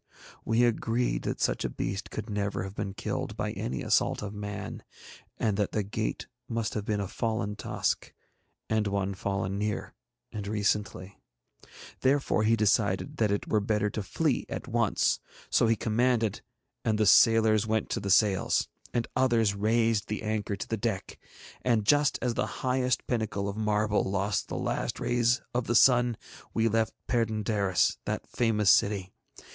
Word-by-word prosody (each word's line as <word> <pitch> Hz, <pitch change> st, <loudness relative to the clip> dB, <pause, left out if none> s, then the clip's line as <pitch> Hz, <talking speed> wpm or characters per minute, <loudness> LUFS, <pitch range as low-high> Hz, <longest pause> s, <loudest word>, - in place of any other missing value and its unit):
We 115 Hz, +2 st, +2 dB
agreed 120 Hz, -, +1 dB
that -, -, -2 dB
such -, -, 0 dB
a -, -, -1 dB
beast 95 Hz, +1 st, -4 dB
could 110 Hz, 0 st, -5 dB
never 100 Hz, -2 st, -2 dB
have 95 Hz, 0 st, -6 dB
been 100 Hz, -1 st, -4 dB
killed -, -, -4 dB
by -, -, -2 dB
any 65 Hz, +1 st, -4 dB
assault -, -, +1 dB
of 105 Hz, 0 st, -5 dB
man, 105 Hz, -1 st, -6 dB, 0.6 s
and 105 Hz, -3 st, 0 dB
that 105 Hz, -2 st, -1 dB
the 105 Hz, -, 0 dB
gate 105 Hz, +2 st, -3 dB, 0.2 s
must 115 Hz, -2 st, -2 dB
have 105 Hz, -2 st, -3 dB
been 105 Hz, -1 st, -1 dB
a 100 Hz, -, -2 dB
fallen 110 Hz, -1 st, -2 dB
tusk, -, -, -2 dB, 0.6 s
and 110 Hz, -1 st, +1 dB
one 100 Hz, -1 st, -1 dB
fallen 95 Hz, 0 st, -2 dB
near 105 Hz, 0 st, -3 dB, 0.4 s
and 105 Hz, -2 st, -5 dB
recently. 100 Hz, -2 st, -1 dB, 0.8 s
Therefore 135 Hz, -4 st, +2 dB
he 110 Hz, +1 st, +4 dB
decided 105 Hz, +5 st, +1 dB
that 110 Hz, -4 st, +2 dB
it 100 Hz, 0 st, -1 dB
were 110 Hz, -, +2 dB
better 105 Hz, 0 st, 0 dB
to 110 Hz, -, -3 dB
flee 140 Hz, -, -1 dB
at -, -, -5 dB
once; 115 Hz, -3 st, +1 dB, 0.3 s
so 115 Hz, -, +4 dB
he 115 Hz, -, +3 dB
commanded, 115 Hz, -1 st, +1 dB, 0.4 s
and 110 Hz, -1 st, +1 dB
the 110 Hz, -, +2 dB
sailors 110 Hz, 0 st, +5 dB
went 110 Hz, -1 st, -1 dB
to -, -, 0 dB
the 100 Hz, -, -4 dB
sails, 100 Hz, -1 st, +3 dB, 0.3 s
and 120 Hz, -1 st, 0 dB
others 115 Hz, -5 st, +3 dB
raised 110 Hz, +1 st, +1 dB
the 105 Hz, -, -4 dB
anchor 105 Hz, -2 st, -1 dB
to 100 Hz, -, -6 dB
the 115 Hz, -, -2 dB
deck, 105 Hz, -3 st, -3 dB, 0.4 s
and 115 Hz, -4 st, +1 dB
just 145 Hz, +5 st, +4 dB
as 125 Hz, -2 st, +1 dB
the -, -, -1 dB, 0.2 s
highest 125 Hz, -1 st, +1 dB
pinnacle 110 Hz, -4 st, -1 dB
of 100 Hz, -, -3 dB
marble 105 Hz, -1 st, +1 dB
lost 100 Hz, +1 st, -1 dB
the -, -, -4 dB
last -, -, -2 dB
rays 120 Hz, +2 st, +1 dB
of 120 Hz, -1 st, -1 dB
the 120 Hz, -, +1 dB
sun 120 Hz, -2 st, +5 dB, 0.4 s
we 115 Hz, 0 st, +3 dB
left 110 Hz, 0 st, 0 dB
Perd├│ndaris, 110 Hz, -5 st, +1 dB
that -, -, -3 dB
famous 105 Hz, -4 st, +2 dB
city. 100 Hz, -2 st, +2 dB
110 Hz, 165 wpm, -28 LUFS, 100-115 Hz, 0.8 s, sailors